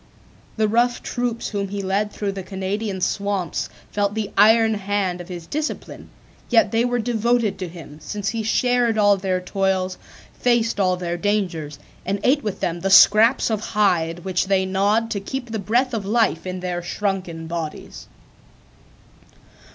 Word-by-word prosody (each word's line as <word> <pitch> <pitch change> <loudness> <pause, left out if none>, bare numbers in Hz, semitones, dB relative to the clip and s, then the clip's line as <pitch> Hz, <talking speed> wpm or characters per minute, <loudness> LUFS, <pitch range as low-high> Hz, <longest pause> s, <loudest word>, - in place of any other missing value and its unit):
The 215 0 +2
rough 240 +3 +1
troops 240 -2 -2
whom 200 -2 -2
he 200 0 -4
led 200 +2 0
through 205 -1 -3
the 195 0 -6
Canadian 190 +1 -4
swamps 200 -2 -1 0.2
felt 205 0 0
the 215 -2 -3
iron 220 +2 +5
hand 200 -3 -1
of 175 - -11
his 175 -2 -7
discipline; 305 - -5 0.4
yet 225 -4 +4
they 230 +1 +2
were 245 0 0
devoted 235 -2 0
to 185 - -3
him, 160 -3 -11
since 200 +4 -3
he 225 0 -2
shared 240 +1 +1
all 205 -1 +5
their 185 -1 -1
toils, 185 0 -1 0.3
faced 235 -3 +1
all 185 -2 +2
their 175 -1 -3
dangers, 175 -7 -1 0.3
and 200 +2 -2
ate 285 +3 +3
with 210 -3 -4
them 170 0 -1
the 195 +3 -1
scraps 220 +5 +6
of 215 - 0
hide 175 -6 0
which 185 0 0
they 190 -1 +2
gnawed 205 +4 +1
to 200 - -1
keep 245 +4 -6
the 220 - -2
breath 240 +6 +1
of 220 -3 -2
life 215 -4 +1
in 185 0 -4
their 180 -1 -3
shrunken 180 -3 -3
bodies. 165 -2 -6
200 Hz, 165 wpm, -22 LUFS, 185-225 Hz, 0.4 s, scraps